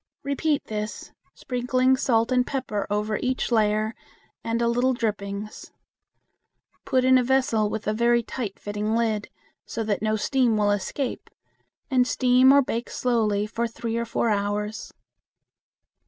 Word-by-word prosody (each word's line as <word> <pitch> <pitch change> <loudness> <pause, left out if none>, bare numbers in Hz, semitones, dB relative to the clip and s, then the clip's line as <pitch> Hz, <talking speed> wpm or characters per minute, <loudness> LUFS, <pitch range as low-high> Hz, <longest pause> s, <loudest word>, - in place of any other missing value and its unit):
Repeat 285 +1 0
this, 210 0 -5 0.2
sprinkling 255 +1 +1
salt 230 -2 +1
and 250 -1 +2
pepper 245 -7 -3
over 210 +1 -1
each 255 0 -1
layer 215 -1 +2 0.5
and 230 0 -1
a 235 - +1
little 245 +2 +2
drippings. 210 -2 -4 1.1
Put 255 -1 +2
in 260 0 +6
a - - +1
vessel 240 -5 +2
with 220 0 -4
a 215 - 0
very 235 +1 +2
tight 220 -4 -5
fitting 210 +1 -2
lid, 220 -3 0 0.3
so 225 - -4
that 210 -2 -1
no 215 0 +1
steam 240 0 +1
will 205 -1 +2
escape, 205 +6 -3 0.6
and 250 -1 +3
steam 255 +1 +4
or 280 0 +6
bake 235 -1 -3
slowly 215 -4 0
for 230 +2 -2
three 230 0 -5
or 235 0 -1
four 230 0 0
hours. 210 +1 -2
230 Hz, 145 wpm, -25 LUFS, 210-255 Hz, 1.1 s, in